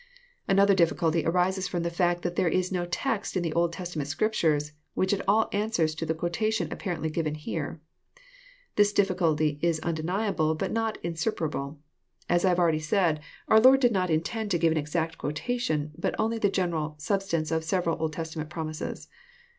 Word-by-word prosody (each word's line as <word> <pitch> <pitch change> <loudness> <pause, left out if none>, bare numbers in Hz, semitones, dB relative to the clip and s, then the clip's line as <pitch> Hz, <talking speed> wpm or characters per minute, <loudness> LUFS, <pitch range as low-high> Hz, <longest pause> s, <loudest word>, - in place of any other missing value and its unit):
Another 200 0 +5
difficulty 170 -2 +2
arises 185 +2 +1
from 175 -2 -2
the 170 - -1
fact, 175 0 +1
that 175 0 -2
there 180 - +2
is 185 +2 +1
no 175 -2 -1
text 210 +1 -2
in 180 - 0
the 165 -2 -2
Old 170 0 +2
Testament 170 -5 -4
Scriptures 155 -5 +1 0.2
which 190 +2 +1
at 195 - 0
all 215 +3 +4
answers 200 -7 +1
to 160 +1 -4
the 160 - 0
quotation 215 +7 -1
apparently 170 -5 -3
given 155 -1 -1
here. 155 +1 -4 1.0
This 205 0 +4
difficulty 160 -7 +1
is 170 -2 +1
undeniable, 165 0 0
but - - -2
not 225 -1 -1
insuperable. 160 -4 -2 0.5
As 175 0 +2
I 190 - +4
have 175 - +2
already 165 -3 +3
said, 160 0 +1 0.3
our 220 - +6
Lord 260 +4 +7
did 245 -3 +4
not 185 -3 0
intend 205 +8 -1
to 180 - +2
give 165 -1 +3
an 160 - 0
exact 160 +2 -2
quotation, 155 -2 -2
but - - -2
only 225 +1 0
the 205 - +3
general 165 -5 -1
sub 195 +6 0
stance 165 -5 -2
of 160 0 0
several 170 0 0
Old 160 -1 -1
Testament 160 -1 -5
promises. 155 -2 -5
170 Hz, 180 wpm, -27 LUFS, 160-195 Hz, 1.0 s, Lord